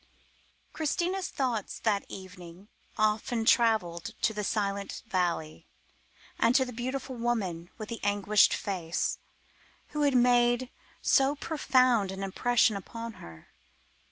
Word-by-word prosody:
Christina's 350 Hz, +5 st, -1 dB
thoughts 245 Hz, -6 st, -2 dB
that 205 Hz, -3 st, 0 dB
evening 185 Hz, 0 st, -11 dB, 0.3 s
often 215 Hz, +2 st, +1 dB
travelled 215 Hz, -9 st, +2 dB
to 220 Hz, -, +3 dB
the 210 Hz, 0 st, -3 dB
silent 200 Hz, -1 st, -2 dB
valley, 175 Hz, -7 st, -2 dB, 0.7 s
and 235 Hz, -, +3 dB
to 260 Hz, -, +4 dB
the 250 Hz, -, -8 dB
beautiful 260 Hz, +2 st, -4 dB
woman 200 Hz, -8 st, -2 dB
with 215 Hz, -2 st, -7 dB
the 230 Hz, -, -5 dB
anguished 205 Hz, 0 st, +4 dB
face, 175 Hz, -4 st, -2 dB, 0.7 s
who 300 Hz, -, -3 dB
had 285 Hz, -2 st, +3 dB
made 245 Hz, 0 st, +3 dB, 0.3 s
so 275 Hz, +2 st, +4 dB
profound 255 Hz, -, +2 dB
an 190 Hz, +1 st, -5 dB
impression 230 Hz, +3 st, +2 dB
upon 230 Hz, +4 st, -7 dB
her. 80 Hz, -1 st, -13 dB
220 Hz, 120 wpm, -29 LUFS, 195-250 Hz, 0.7 s, to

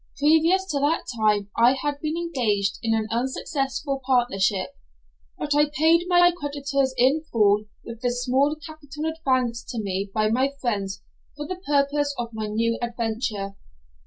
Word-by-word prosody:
Previous 320 Hz, +6 st, +4 dB
to 285 Hz, -, 0 dB
that 290 Hz, +4 st, +1 dB
time 210 Hz, -2 st, +1 dB
I 240 Hz, +2 st, +5 dB
had 285 Hz, +1 st, -3 dB
been 310 Hz, +1 st, -2 dB
engaged 230 Hz, -12 st, 0 dB
in 225 Hz, -1 st, +1 dB
an 220 Hz, -1 st, 0 dB
unsuccessful 270 Hz, +3 st, -2 dB
partnership, 210 Hz, -7 st, +1 dB, 0.6 s
but 290 Hz, -, -1 dB
I 295 Hz, 0 st, +3 dB
paid 325 Hz, +4 st, +3 dB
my 350 Hz, -1 st, +5 dB
creditors 280 Hz, -3 st, -1 dB
in 265 Hz, +6 st, +3 dB
full 210 Hz, -2 st, +3 dB, 0.2 s
with 230 Hz, -1 st, -8 dB
the 245 Hz, -, +1 dB
small 255 Hz, +4 st, +1 dB
capital 305 Hz, -1 st, -8 dB
advanced 255 Hz, -7 st, -1 dB
to 235 Hz, -, -4 dB
me 195 Hz, -1 st, -2 dB
by 215 Hz, +1 st, +1 dB
my 260 Hz, +5 st, +1 dB
friends 200 Hz, -6 st, -2 dB, 0.3 s
for 295 Hz, -, -5 dB
the 370 Hz, +3 st, -6 dB
purpose 285 Hz, 0 st, +1 dB
of 235 Hz, -1 st, -4 dB
my 220 Hz, -1 st, -3 dB
new 230 Hz, +2 st, 0 dB
adventure. 225 Hz, -4 st, -3 dB
260 Hz, 155 wpm, -24 LUFS, 225-295 Hz, 0.6 s, I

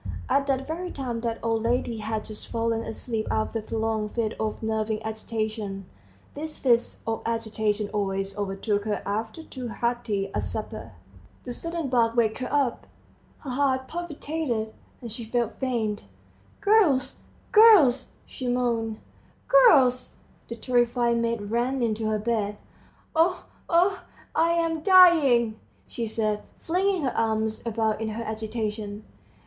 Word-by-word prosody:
At 275 Hz, 0 st, +2 dB
that 270 Hz, -1 st, 0 dB
very 345 Hz, +4 st, -4 dB
time 245 Hz, -4 st, -4 dB
the 230 Hz, -1 st, -2 dB
old 225 Hz, -1 st, +1 dB
lady 235 Hz, 0 st, 0 dB
had 215 Hz, 0 st, -3 dB
just 215 Hz, -1 st, -8 dB
fallen 230 Hz, 0 st, -1 dB
asleep 225 Hz, -1 st, -4 dB
after 220 Hz, +1 st, -1 dB
a -, -, -6 dB
prolonged 220 Hz, -1 st, -2 dB
fit 225 Hz, -2 st, 0 dB
of 220 Hz, +1 st, -3 dB
"nervous 220 Hz, 0 st, -1 dB
agitation"; 215 Hz, -2 st, -4 dB, 0.5 s
these 305 Hz, +1 st, -6 dB
fits 240 Hz, -3 st, +1 dB
of 225 Hz, 0 st, -2 dB
agitation 220 Hz, -2 st, -1 dB
always 195 Hz, -1 st, -2 dB
overtook 205 Hz, +1 st, -1 dB
her 210 Hz, -2 st, -2 dB
after 220 Hz, +9 st, -3 dB
too 255 Hz, -5 st, -7 dB
hearty 225 Hz, -4 st, -2 dB
a -, -, 0 dB
supper. -, -, -6 dB, 0.5 s
The 245 Hz, -, -5 dB
sudden 335 Hz, +1 st, -4 dB
bark 230 Hz, -2 st, +2 dB
waked 225 Hz, -1 st, +2 dB
her 255 Hz, -, -4 dB
up: 275 Hz, -4 st, 0 dB, 0.5 s
her 275 Hz, -, -6 dB
heart 260 Hz, 0 st, +1 dB
palpitated, 300 Hz, -9 st, -3 dB, 0.3 s
and 235 Hz, -2 st, -7 dB
she 230 Hz, +2 st, -6 dB
felt 230 Hz, 0 st, -2 dB
faint. 225 Hz, -5 st, -1 dB, 0.6 s
"Girls, 400 Hz, -11 st, +3 dB, 0.3 s
girls!" 370 Hz, -, +7 dB, 0.2 s
she 255 Hz, -, -6 dB
moaned. 235 Hz, -3 st, 0 dB, 0.5 s
"Girls!" 285 Hz, -, +5 dB, 0.3 s
The 235 Hz, -, -5 dB
terrified 240 Hz, -1 st, +1 dB
maids 230 Hz, -2 st, -1 dB
ran 240 Hz, +5 st, 0 dB
into 220 Hz, -1 st, 0 dB
her 215 Hz, -, +1 dB
bedroom. 210 Hz, -2 st, -1 dB, 0.6 s
"Oh, 340 Hz, +3 st, +2 dB, 0.2 s
oh, 365 Hz, +3 st, +3 dB, 0.3 s
I 335 Hz, +1 st, +3 dB
am 330 Hz, -2 st, 0 dB
dying!" 300 Hz, -, +6 dB, 0.3 s
she 230 Hz, -1 st, -4 dB
said, 215 Hz, -1 st, -1 dB, 0.2 s
flinging 370 Hz, 0 st, 0 dB
her 260 Hz, -, -1 dB
arms 220 Hz, -1 st, 0 dB
about 220 Hz, -1 st, 0 dB
in 220 Hz, -, -1 dB
her 225 Hz, +2 st, -4 dB
agitation. 215 Hz, -1 st, -4 dB
230 Hz, 140 wpm, -26 LUFS, 220-265 Hz, 0.6 s, girls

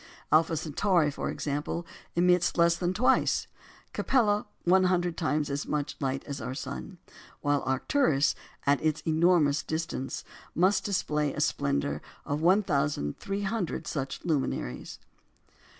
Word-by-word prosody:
Alpha 160 Hz, +1 st, +4 dB
Centauri, 160 Hz, +1 st, +1 dB
for -, -, -4 dB
example, 150 Hz, +4 st, -3 dB, 0.3 s
emits 180 Hz, 0 st, +3 dB
less 170 Hz, 0 st, +5 dB
than 175 Hz, +1 st, -1 dB
twice, 210 Hz, +7 st, +2 dB, 0.5 s
Capella 210 Hz, -6 st, +2 dB, 0.2 s
one 185 Hz, +1 st, +4 dB
hundred 175 Hz, -2 st, +1 dB
times 155 Hz, -3 st, 0 dB
as 140 Hz, 0 st, -3 dB
much 150 Hz, -1 st, -2 dB
light 135 Hz, -1 st, -2 dB
as 140 Hz, -2 st, -6 dB
our 125 Hz, +3 st, -4 dB
sun; 140 Hz, +7 st, -6 dB, 0.4 s
while 145 Hz, -1 st, +1 dB
Arcturus, 140 Hz, -, +2 dB, 0.3 s
at 140 Hz, +1 st, +2 dB
its 155 Hz, 0 st, +1 dB
enormous 160 Hz, -2 st, +3 dB
distance, 160 Hz, -5 st, -4 dB, 0.3 s
must 185 Hz, +4 st, +3 dB
display 150 Hz, -7 st, 0 dB
the -, -, -5 dB
splendour 70 Hz, +1 st, 0 dB, 0.2 s
of 145 Hz, +2 st, -2 dB
1,300 185 Hz, -, 0 dB
such 135 Hz, -3 st, -4 dB
luminaries. 135 Hz, -, -2 dB
155 Hz, 120 wpm, -28 LUFS, 140-180 Hz, 0.5 s, less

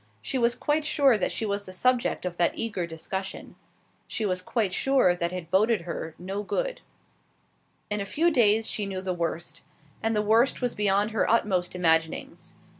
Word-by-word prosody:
She 265 Hz, -, -2 dB
was 235 Hz, 0 st, +2 dB
quite 300 Hz, +1 st, 0 dB
sure 285 Hz, -4 st, +4 dB
that 205 Hz, -, 0 dB
she 225 Hz, -, -1 dB
was 200 Hz, -1 st, -2 dB
the -, -, -7 dB
subject 250 Hz, +2 st, +1 dB
of 175 Hz, -1 st, -4 dB
that 175 Hz, -, +1 dB
eager 205 Hz, -6 st, -2 dB
discussion. 190 Hz, +4 st, -6 dB, 0.5 s
She 220 Hz, -, -2 dB
was 185 Hz, -2 st, 0 dB
quite 200 Hz, 0 st, -1 dB
sure 265 Hz, -6 st, +3 dB
that 170 Hz, 0 st, -2 dB
it 180 Hz, -2 st, -7 dB
boded 215 Hz, +2 st, +3 dB
her 165 Hz, -1 st, -6 dB
no 190 Hz, +3 st, -4 dB
good. -, -, -3 dB, 1.1 s
In 210 Hz, 0 st, 0 dB
a -, -, -3 dB
few 330 Hz, -, +1 dB
days 225 Hz, -5 st, +4 dB
she 205 Hz, -2 st, -2 dB
knew 190 Hz, -1 st, -4 dB
the 185 Hz, -1 st, -2 dB
worst; 170 Hz, -1 st, -4 dB, 0.4 s
and 225 Hz, 0 st, 0 dB
the 210 Hz, -, +1 dB
worst 225 Hz, +5 st, +3 dB
was 245 Hz, -2 st, -1 dB
beyond 205 Hz, +1 st, +2 dB
her 220 Hz, -, 0 dB
utmost 190 Hz, -6 st, +1 dB
imaginings. 165 Hz, -2 st, 0 dB
205 Hz, 185 wpm, -26 LUFS, 180-230 Hz, 1.1 s, sure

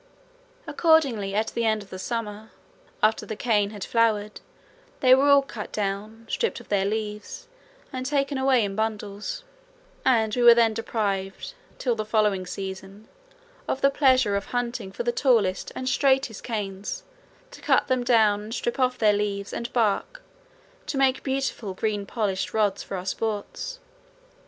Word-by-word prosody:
Accordingly 265 Hz, -, +2 dB
at 220 Hz, +1 st, +1 dB
the 235 Hz, -, -2 dB
end 220 Hz, -2 st, +1 dB
of 200 Hz, -, -20 dB
the 185 Hz, -, -7 dB
summer, 220 Hz, 0 st, -4 dB, 0.5 s
after 215 Hz, +1 st, +3 dB
the 220 Hz, -, -5 dB
cane 210 Hz, -2 st, +1 dB
had 205 Hz, -2 st, -7 dB
flowered, 215 Hz, -3 st, +1 dB, 0.6 s
they 255 Hz, -1 st, +6 dB
were 270 Hz, +2 st, +5 dB
all 280 Hz, -1 st, +7 dB
cut 230 Hz, -6 st, -8 dB
down, 210 Hz, +2 st, -3 dB
stripped 465 Hz, -, -1 dB
of -, -, -15 dB
their 195 Hz, -2 st, +2 dB
leaves, 210 Hz, -, -4 dB, 0.5 s
and 255 Hz, 0 st, -3 dB
taken 275 Hz, 0 st, 0 dB
away 260 Hz, -4 st, +3 dB
in 195 Hz, -1 st, -4 dB
bundles, 210 Hz, -, -3 dB, 0.6 s
and 220 Hz, -4 st, +2 dB
we 245 Hz, -, 0 dB
were 240 Hz, -1 st, +9 dB
then 230 Hz, -2 st, +4 dB
deprived 205 Hz, -, -3 dB, 0.2 s
till 245 Hz, -, 0 dB
the 215 Hz, -1 st, -3 dB
following 210 Hz, -4 st, +1 dB
season 195 Hz, +2 st, -7 dB, 0.6 s
of 265 Hz, -, -2 dB
the 275 Hz, -, +4 dB
pleasure 260 Hz, -7 st, +3 dB
of 200 Hz, -, -2 dB
hunting 240 Hz, -5 st, -3 dB
for 240 Hz, -, -4 dB
the 240 Hz, -, +1 dB
tallest 225 Hz, -8 st, +1 dB
and 255 Hz, -, -4 dB
straightest 265 Hz, -4 st, +2 dB
canes 210 Hz, -, -4 dB, 0.5 s
to -, -, -12 dB
cut -, -, +3 dB
them 255 Hz, -2 st, +1 dB
down 220 Hz, -4 st, +4 dB
and 220 Hz, +3 st, -6 dB
strip 240 Hz, +2 st, -2 dB
off 255 Hz, -1 st, +1 dB
leaves 205 Hz, -1 st, +1 dB
and 235 Hz, -, -4 dB
bark 240 Hz, -, 0 dB, 0.6 s
to 300 Hz, -2 st, -3 dB
make 265 Hz, -1 st, +3 dB
beautiful 265 Hz, -7 st, -2 dB
green 205 Hz, -1 st, -2 dB
polished 200 Hz, -4 st, -2 dB
rods 205 Hz, -2 st, +1 dB
for 195 Hz, -, -5 dB
our 180 Hz, -, -6 dB
sports. 225 Hz, -, -3 dB
220 Hz, 160 wpm, -25 LUFS, 205-255 Hz, 0.6 s, were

